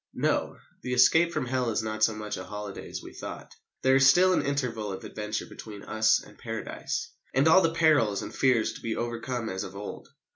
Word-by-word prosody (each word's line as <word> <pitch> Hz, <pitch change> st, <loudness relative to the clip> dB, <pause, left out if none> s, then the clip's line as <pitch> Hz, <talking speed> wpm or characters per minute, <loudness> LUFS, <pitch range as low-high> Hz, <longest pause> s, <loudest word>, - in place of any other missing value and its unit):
No, -, -, 0 dB, 0.2 s
the 125 Hz, -, -3 dB
escape 160 Hz, +7 st, +5 dB
from 155 Hz, -6 st, -2 dB
Hell 125 Hz, -1 st, 0 dB
is 110 Hz, 0 st, -1 dB
not 110 Hz, 0 st, -2 dB
so 110 Hz, -, +3 dB
much 105 Hz, 0 st, -4 dB
a 95 Hz, -, -6 dB
holiday 105 Hz, 0 st, -7 dB
as -, -, -6 dB
we -, -, -10 dB
thought. -, -, -8 dB, 0.3 s
There 130 Hz, 0 st, +5 dB
is 135 Hz, 0 st, +7 dB
still 185 Hz, +5 st, +5 dB
an -, -, +2 dB
interval 125 Hz, -7 st, -2 dB
of 95 Hz, -, -7 dB
adventure 105 Hz, 0 st, -4 dB
between 105 Hz, -2 st, -10 dB
us 110 Hz, 0 st, +3 dB
and -, -, -17 dB
Paradise, -, -, -4 dB, 0.2 s
and 135 Hz, +4 st, +4 dB
all 165 Hz, +4 st, +7 dB
the 165 Hz, -2 st, +1 dB
perils 145 Hz, -12 st, +3 dB
and -, -, -7 dB
fears 125 Hz, -4 st, +2 dB
to -, -, -11 dB
be 115 Hz, -1 st, -2 dB
overcome 120 Hz, 0 st, -3 dB
as 95 Hz, -2 st, -3 dB
of 95 Hz, -, -9 dB
old. 100 Hz, +1 st, -7 dB
115 Hz, 215 wpm, -28 LUFS, 105-135 Hz, 0.3 s, is